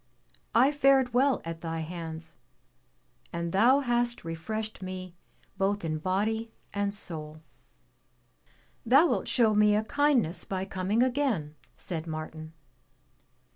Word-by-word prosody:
"I 265 +4 +6
fared 275 -3 +3
well 265 +2 +3
at 165 0 -6
thy 165 -1 -3
hands, 160 -1 -7 0.9
and 170 0 -3
thou 245 +9 +5
hast 240 -4 -1
refreshed 215 +8 -4
me 185 -1 -6 0.5
both 200 -1 0
in 155 -1 -2
body 215 +6 -1 0.2
and 205 0 0
soul." 155 -6 -5 1.4
"Thou 270 +8 +6
wilt - - 0
show 225 -4 +3
me 210 0 +4
a 215 - +1
kindness 235 - +1
by 190 -1 -3
coming 195 +5 0
again," 245 - 0 0.2
said 165 -2 -5
Martin. 155 0 -6
200 Hz, 120 wpm, -28 LUFS, 165-240 Hz, 1.4 s, I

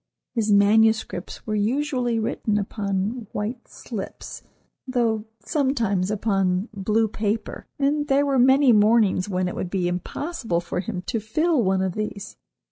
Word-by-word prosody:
His 220 -3 0
manuscripts 215 -2 +2
were 215 - -3
usually 245 +2 0
written 220 -1 -1
upon 205 +2 -2
white 225 +4 -4
"slips," 215 -6 -7 0.5
though 230 -4 0 0.2
sometimes 230 - 0
upon 195 -2 0
blue 215 +3 +1
paper, 210 +1 -3
and 290 +1 +1
there 275 +1 +3
were 275 -2 +2
many 265 +1 +6
mornings 210 -3 +3
when 185 -1 0
it 180 - -3
would 180 - -4
be 180 -2 0
impossible 185 - -2
for 175 +1 -4
him 185 -2 -4
to 225 +4 -2
fill 300 +8 +1
one 190 -1 +1
of 190 -2 -1
these. 210 -1 -5
215 Hz, 140 wpm, -24 LUFS, 195-245 Hz, 0.5 s, many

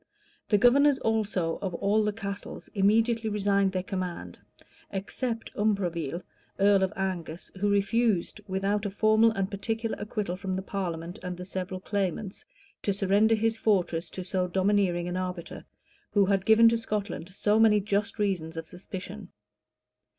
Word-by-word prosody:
[] - - -36
The 210 - +5
governors 275 +6 +5
also 210 -7 0
of 190 -4 -3
all 205 +4 +2
the 210 - +1
castles 200 -1 -6
immediately 225 +3 +2
resigned 200 -2 +2
their 185 -1 -2
command; 185 -2 -5 0.5
except 225 +4 -4
Umfreville, 175 -6 -1 0.4
earl 200 0 +5
of 190 0 +1
Angus, 180 -4 -4
who 205 +1 +2
refused, 205 -1 +1
without 200 +2 0
a - - -2
formal 215 +3 +4
and 195 -2 -2
particular 225 +3 -2
acquittal 205 -3 -3
from 190 0 -3
the 190 - -3
parliament 175 -2 -4
and 180 -1 -5
the 180 - -7
several 185 0 -4
claimants, 195 0 -3 0.4
to 200 - 0
surrender 200 +3 +3
his 225 +1 0
fortresses 180 -6 +1
to 185 - -6
so 180 0 -1
domineering 185 -2 +1
an 180 +1 -2
arbiter, 180 -2 -5 0.5
who 205 -2 +5
had 195 -1 +1
given 220 +1 +7
to 230 0 +1
Scotland 205 -5 -3
so 210 +3 +1
many 215 -2 +6
just 205 +2 -1
reasons 180 -6 -1
of 165 - -4
suspicion. 180 - -8
200 Hz, 155 wpm, -28 LUFS, 185-215 Hz, 0.5 s, given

